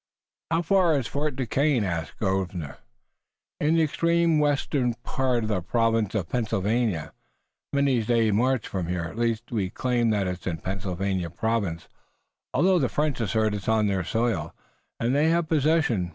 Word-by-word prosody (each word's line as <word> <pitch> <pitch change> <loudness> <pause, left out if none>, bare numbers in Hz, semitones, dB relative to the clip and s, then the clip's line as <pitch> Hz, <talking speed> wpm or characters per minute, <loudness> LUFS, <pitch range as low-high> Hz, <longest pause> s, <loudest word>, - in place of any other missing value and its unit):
"How 165 +1 +1
far 175 -3 +3
is 135 - -2
Fort 145 +1 -2
Duquesne?" 135 0 +1
asked 85 -4 -3
Grosvenor. 95 -7 -2 0.8
"In 155 +2 +2
the 165 - +4
extreme 170 +1 +2
western 140 -4 +1
part 130 -3 0
of 110 - -3
the 100 -4 0
province 115 +1 +1
of 95 -6 -1
Pennsylvania, 110 -5 -1 0.6
many 140 -4 +2
days' 115 -1 +2
march 125 +2 +1
from 90 -3 -3
here. 90 -1 -2
At 85 +7 -7
least, 115 +1 -1
we 100 -6 -1
claim 120 +1 0
that 105 -3 +1
it's 90 0 -4
in 85 -3 -1
Pennsylvania 95 0 -3
province, 100 -5 -2 0.6
although 180 +6 +3
the 130 -5 +1
French 150 -4 -1
assert 110 0 +1
it's 105 0 -3
on 110 -1 +3
their 95 -3 0
soil, 115 +6 -1 0.4
and 120 +2 +1
they 150 +3 +3
have 170 0 +1
possession. 150 - +2
115 Hz, 160 wpm, -26 LUFS, 95-140 Hz, 0.8 s, the